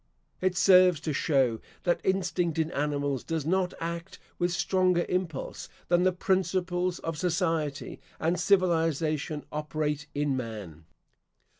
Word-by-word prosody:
It 185 -1 +1
serves 185 -4 +6
to 155 -1 -2
show 130 -5 +2 0.2
that 175 - +1
instinct 180 -3 0
in 160 0 0
animals 145 -2 -1
does 160 -3 -3
not 185 +2 +1
act 170 +2 -5 0.2
with 175 0 +1
stronger 180 -1 +2
impulse 180 -6 -3 0.2
than 175 0 +4
the 185 +1 +4
principles 180 -1 0
of 165 -2 -5
society 165 -5 -1 0.2
and 170 +2 0
civilisation 165 -5 +1
operate 150 0 -2
in 145 -1 +1
man. 105 -10 -6
165 Hz, 125 wpm, -28 LUFS, 150-180 Hz, 0.2 s, serves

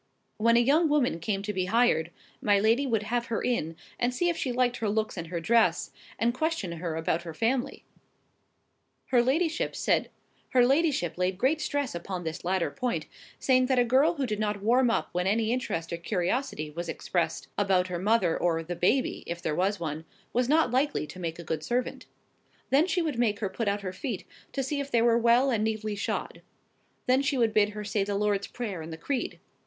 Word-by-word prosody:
When 230 +2 +4
a - - +6
young 300 +6 +3
woman 265 - +2
came 195 +3 -2
to 210 0 -3
be 185 -1 -1
hired, 185 -6 +2 0.3
my 205 -1 +3
lady 230 +7 +3
would 225 -4 +1
have 235 +2 -1
her 230 - -1
in, 165 -10 -1 0.2
and 245 +1 +1
see 350 +6 +1
if 340 - 0
she 260 - -2
liked 245 0 +1
her 220 - -1
looks 215 +1 -1
and 170 -3 -5
her 170 0 -3
dress, 230 +8 +2 0.3
and 235 +1 +1
question 310 - -1
her 165 -1 -4
about 165 +1 0
her 165 -2 -8
family. 245 - -1 1.3
Her 245 -2 +5
ladyship 320 +6 0 0.8
laid 245 - +2
great 275 +8 +1
stress 285 -3 -1
upon 175 +1 -5
this 160 0 -5
latter 185 0 0
point, 250 -3 -2 0.3
saying 255 -1 +3
that 260 -1 +2
a 245 - +5
girl 275 +8 +3
who 280 -3 -1
did 210 -3 -3
not 210 -2 -2
warm 245 +3 +4
up 230 - 0
when 180 +1 -1
any 220 +2 +1
interest 170 -10 -3
or - - -2
curiosity 175 - -2
was 170 +2 -5
expressed 165 -3 -2
about 190 -3 +2
her 175 -1 -3
mother, 195 -4 +2
or 165 -2 0
the 175 +2 -5
"baby" 250 +10 +1
(if 170 0 -4
there 160 -3 -2
was 190 +5 0
one), 160 -1 -4 0.3
was 250 +1 +1
not 310 -4 +3
likely 265 - +1
to 185 - -11
make 165 -2 -4
a 170 - -8
good 155 -1 -3
servant. 245 +7 -2 0.6
Then 290 +6 +4
she 360 -2 +1
would 295 -7 -2
make 215 -4 +2
her 205 -2 -2
put 210 +3 -3
out 200 0 0
her 185 -2 -5
feet, 215 0 -4 0.3
to 270 - -1
see 285 +2 -2
if 280 0 -4
they 235 -3 +3
were 235 0 +4
well 240 +3 +4
and 220 -3 +1
neatly 215 -1 -2
shod. 200 - -3 0.6
Then 255 +2 +3
she 280 -1 0
would 230 -3 +2
bid 210 -1 +4
her 210 - -4
say 205 0 0
the 200 0 -2
Lord's 205 -1 0
Prayer 210 -8 -5
and 160 +1 -8
the 160 - -6
Creed. 255 +9 -3
220 Hz, 210 wpm, -28 LUFS, 180-255 Hz, 1.3 s, a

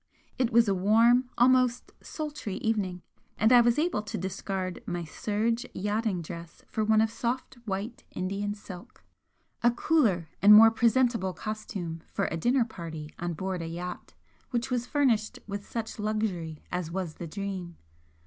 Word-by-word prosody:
It 250 -2 +2
was 230 0 +5
a 200 - +3
warm, 230 +6 +4
almost 250 0 +3
sultry 295 -10 -5
evening, 195 -6 -1 0.3
and 220 +3 +4
I 245 - +9
was 235 0 +3
able 320 -7 +1
to 205 -2 -5
discard 190 0 -4
my 175 -1 -2
serge 225 +7 -1
yachting 205 -2 -1
dress 170 +1 -9
for 220 - -1
one 215 0 +4
of 220 0 +1
soft 240 +2 -3
white 200 +4 -4
Indian 200 +2 -3
silk, 185 -3 -11 0.6
a 240 - +5
cooler 235 - +2
and 210 +1 +9
more 225 +1 +9
presentable 230 -4 +2
costume 195 -7 -5
for - - 0
a - - -1
dinner 240 +7 +2
party 165 -8 -8
on 175 0 -2
board 185 +2 -3
a 165 - -4
yacht 175 +2 -6 0.3
which 250 +1 -2
was 245 -1 -1
furnished 245 -8 +1
with 200 -1 -6
such 225 -1 -4
luxury 205 -7 -2
as 180 -2 -2
was 180 -2 -3
the 170 - -6
'Dream.' 185 -1 -5
210 Hz, 160 wpm, -28 LUFS, 180-235 Hz, 0.6 s, I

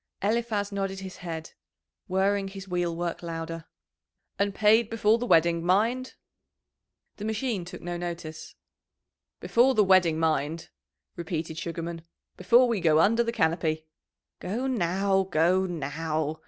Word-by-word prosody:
Eliphaz 215 -1 0
nodded 195 -1 -3
his 190 -1 -8
head, 165 -2 -6 0.6
whirring 195 +1 +1
his 195 0 -9
wheelwork 175 -1 -2
louder. 165 -1 -5 0.7
"And 200 -1 0
paid 215 +1 +4
before 225 0 +2
the 245 - -3
wedding, 170 -1 +3
mind?" 225 +8 +1 1.0
The 210 - -6
machine 220 -3 -2
took 180 +1 -10
no 175 0 -4
notice. 170 -2 -6 0.9
"Before 255 +3 +3
the 215 - +5
wedding, 185 -4 +4
mind," 160 0 -1 0.5
repeated 160 -2 -4
Sugarman. 170 0 -5 0.3
"Before 240 +7 +4
we 230 -4 0
go 160 -3 +4
under 230 +7 +4
the 230 0 0
canopy." 160 -5 0 0.5
"Go 220 +8 -3
now, 195 -4 +1
go 185 +1 +2
now!" 155 -1 -3
180 Hz, 125 wpm, -27 LUFS, 165-210 Hz, 1.0 s, the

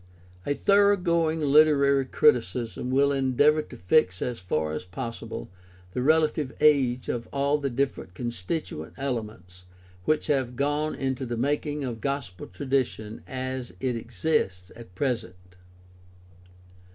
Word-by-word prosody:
A 145 - +1
thoroughgoing 175 -6 +3
literary 140 -2 +4
criticism 125 -3 +1
will 140 +2 +3
endeavor 140 +3 +3
to 135 -4 -12
fix 90 - +2
as 120 -2 -3
far 80 -4 -1
as 75 - -4
possible 115 +3 -6 0.5
the 125 - -1
relative 155 -1 +2
age 130 -5 +3
of 115 -1 -3
all 140 +1 +1
the 140 -1 -1
different 130 -7 -2
constituent 120 - -4
ele 135 -4 -1
ments 90 -4 -14 0.4
which 155 - +1
have 130 -4 0
gone 145 +3 0
into 130 -1 -2
the 120 -2 -3
making 145 +3 -1
of 120 -4 -4
gospel 140 -11 -4
tradition 115 0 -2
as 130 -1 -5
it 130 -2 -1
exists 110 - -1
at 115 -6 -13
present. 115 -6 -2
130 Hz, 125 wpm, -26 LUFS, 115-145 Hz, 0.5 s, literary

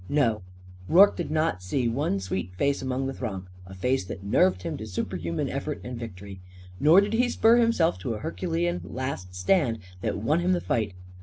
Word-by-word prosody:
No; 115 -8 +2 0.5
Rorke 195 +4 +7
did 175 - -4
not 155 - 0
see 120 +7 -1
one 115 -3 0
sweet 90 -1 -4
face 140 +7 +1
in 130 - -4
the 135 +1 -1
throng 95 -8 -5 0.2
a 95 - -10
face 125 +5 0
that 95 +1 -7
nerved 95 -2 +2
him - - -3
to 110 - -7
superhuman 90 -4 -3
effort - - -3
and 125 0 -6
victory. 100 -4 -8 0.4
Nor 160 +6 +7
did 205 +2 -2
he 245 +2 +2
spur 230 0 +4
himself 230 - +2
to 110 +5 -3
a - - -6
Herculean 175 +1 -2
last 125 -9 -5
stand 120 - +2 0.2
that - - -1
won 145 +11 +1
him 180 +1 +2
the 180 - +1
fight. 105 -5 -1
125 Hz, 195 wpm, -26 LUFS, -, 0.5 s, Rorke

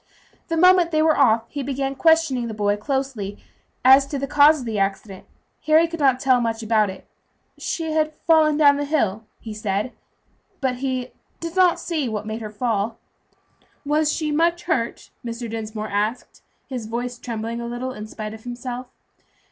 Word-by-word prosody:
The 330 - -1
moment 360 0 +6
they 310 -1 +2
were 315 -1 +4
off 230 -5 +4
he 285 - -5
began 270 0 -2
questioning 315 -5 +2
the 220 - -6
boy 205 -1 +1
closely 240 -4 -3 0.5
as 270 +1 +7
to 280 - -3
the 275 - -2
cause 295 +2 +5
of 250 - -7
the 220 -3 -2
accident. 195 0 -3 0.4
Harry 315 +2 +5
could 335 0 -7
not 265 -3 +3
tell 260 -2 +3
much 225 -1 -2
about 215 -2 +2
it. 190 - -9 0.5
"She 325 -2 -3
had 310 0 +1
fallen 310 -2 +3
down 285 -2 +5
the 290 - -2
hill," 220 -8 0
he 220 - -8
said, 210 +2 -2 0.7
"but 260 -2 -1
he 255 -1 -3 0.3
did 335 +1 -6
not 365 -2 +4
see 310 -7 -2
what 210 -1 -4
made 220 +1 -5
her 215 - -5
fall." 220 0 -1 0.9
"Was 300 +1 +2
she 310 -2 -2
much 340 +3 +1
hurt?" 240 -9 -2
Mr. 235 0 -5
Dinsmore 215 -1 -5
asked, 210 +4 -2 0.3
his 250 -5 -5
voice 240 +2 -4
trembling 230 0 -4
a 235 - -5
little 240 +2 -4
in 215 -4 -8
spite 215 0 -6
of 220 0 -11
himself. 245 +1 -6
250 Hz, 180 wpm, -22 LUFS, 220-300 Hz, 0.9 s, as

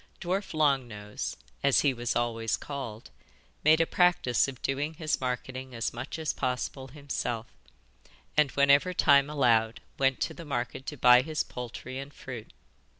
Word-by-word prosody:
Dwarf 185 0 -2
Long 140 -5 +3
Nose 105 - -6 0.2
as 140 -1 +4
he 140 -2 +3
was 120 -1 -2
always 115 -2 0
called 120 -6 -7 0.5
made 155 +1 +6
a 165 - +4
practice 175 -10 +3
of 130 -3 -7
doing 145 +4 -1
his 155 -3 -1
marketing 130 0 -4
as 115 - -2
much 120 +6 -5
as 160 -2 -1
possible 130 +1 -3
himself, 130 -5 -4 0.9
and 150 -2 +4
whenever 140 +6 +4
time 140 -2 +5
allowed 115 -6 +2 0.2
went 135 -1 +2
to - - -1
the 170 - -9
market 130 -2 -4
to 150 - -5
buy 125 0 +7
his 155 +2 -2
poultry 125 +1 -7
and 140 +1 -9
fruit. 125 -4 -8
135 Hz, 155 wpm, -29 LUFS, 120-145 Hz, 0.9 s, buy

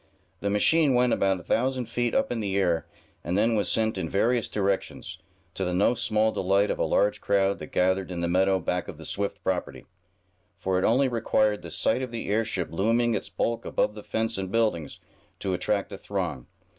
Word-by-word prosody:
The 100 - -1
machine 140 +7 +3
went 125 0 +3
about 95 -1 +1
a - - -12
thousand 130 +1 0
feet 120 +1 -1
up - - +1
in 120 - -1
the 100 -2 -1
air, 85 -4 +1 0.4
and 90 +4 -1
then 115 +3 +3
was 105 -4 +1
sent 110 -3 +1
in 80 -3 -3
various 115 +4 +1
directions, 100 -2 -2 0.3
to 95 - -3
the 90 -1 -1
no 100 +6 +3
small 110 -2 +1
delight 100 +2 +2
of - - -3
a - - +2
large 105 - +1
crowd 100 -1 +1
that 75 - -7
gathered 95 +1 +1
in 90 -2 -4
the 85 - 0
meadow 95 +2 +3
back 90 0 -2
of - - -8
the - - -10
Swift 100 0 -3
property; 95 -1 -2 0.7
for 95 0 0
it - - -1
only 130 +4 +3
required 110 -3 +1
the - - -8
sight 130 - 0
of 130 - -3
the 115 -3 -5
airship 105 -4 0
looming 115 +7 +2
its 100 -2 -3
bulk 115 +4 -1
above - - 0
the 105 - -9
fence 110 0 -2
and 95 -1 -4
buildings, 105 -10 0 0.4
to 95 - -2
attract 100 +2 -1
a - - -7
throng. 60 - -4
100 Hz, 205 wpm, -26 LUFS, 95-115 Hz, 0.7 s, machine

